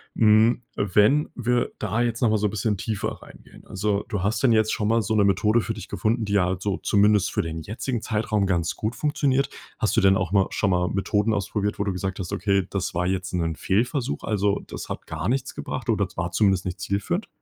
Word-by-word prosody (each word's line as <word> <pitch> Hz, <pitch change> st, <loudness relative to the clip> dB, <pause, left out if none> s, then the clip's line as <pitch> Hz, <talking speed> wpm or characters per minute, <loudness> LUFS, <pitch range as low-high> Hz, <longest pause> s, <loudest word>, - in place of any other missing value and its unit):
Hm, 110 Hz, +2 st, +4 dB
wenn 105 Hz, +9 st, +3 dB
wir 125 Hz, -1 st, 0 dB
da 110 Hz, +2 st, -1 dB
jetzt 120 Hz, 0 st, -2 dB
noch 120 Hz, -, +4 dB
mal 110 Hz, -, +3 dB
so 105 Hz, -, +1 dB
bisschen 105 Hz, 0 st, -1 dB
tiefer 110 Hz, +3 st, -3 dB
reingehen, -, -, -16 dB
also, 100 Hz, +1 st, -1 dB
du 100 Hz, -, -2 dB
hast 110 Hz, +6 st, -1 dB
dann 125 Hz, -, +5 dB
jetzt 110 Hz, -1 st, +3 dB
schon 105 Hz, -, -1 dB
mal 115 Hz, +1 st, +3 dB
so 110 Hz, +1 st, -1 dB
'ne 105 Hz, -, +4 dB
Methode 105 Hz, +4 st, +3 dB
für 115 Hz, 0 st, -2 dB
dich -, -, -9 dB
gefunden, 110 Hz, +4 st, 0 dB
die 100 Hz, -1 st, +1 dB
halt 90 Hz, 0 st, 0 dB
so 100 Hz, -1 st, -1 dB
zumindest 105 Hz, -1 st, +3 dB
für -, -, 0 dB
den 80 Hz, -1 st, -5 dB
jetzigen 115 Hz, +4 st, -4 dB
Zeitraum 105 Hz, -2 st, 0 dB
ganz 85 Hz, -3 st, 0 dB
gut 110 Hz, +3 st, -3 dB
funktioniert. 140 Hz, -2 st, +1 dB, 0.3 s
Hast -, -, 0 dB
du -, -, +5 dB
denn 95 Hz, 0 st, +5 dB
auch 95 Hz, -1 st, -1 dB
mal 100 Hz, -2 st, +4 dB
schon 100 Hz, -, 0 dB
mal 90 Hz, -1 st, +1 dB
Methoden 105 Hz, +2 st, 0 dB
ausprobiert, 105 Hz, 0 st, -2 dB
wo -, -, +1 dB
du 100 Hz, -, -1 dB
gesagt 95 Hz, +1 st, -4 dB
hast: 90 Hz, -, -5 dB
„Okay, 100 Hz, 0 st, +1 dB
das 95 Hz, -3 st, -3 dB
war 90 Hz, +1 st, 0 dB
jetzt 95 Hz, 0 st, -2 dB
'nen 85 Hz, -2 st, -1 dB
Fehlversuch, 115 Hz, -, -1 dB
also, 100 Hz, -1 st, 0 dB
das -, -, -7 dB
hat -, -, -7 dB
gar 80 Hz, +2 st, -4 dB
nichts 135 Hz, +1 st, -1 dB
gebracht 130 Hz, -, -5 dB
oder 105 Hz, -4 st, +2 dB
z -, -, -20 dB
war 85 Hz, 0 st, -2 dB
zumindest 95 Hz, 0 st, +2 dB
nicht 90 Hz, +1 st, -4 dB
zielführend?“ 100 Hz, -, -2 dB
105 Hz, 225 wpm, -24 LUFS, 95-110 Hz, 0.3 s, dann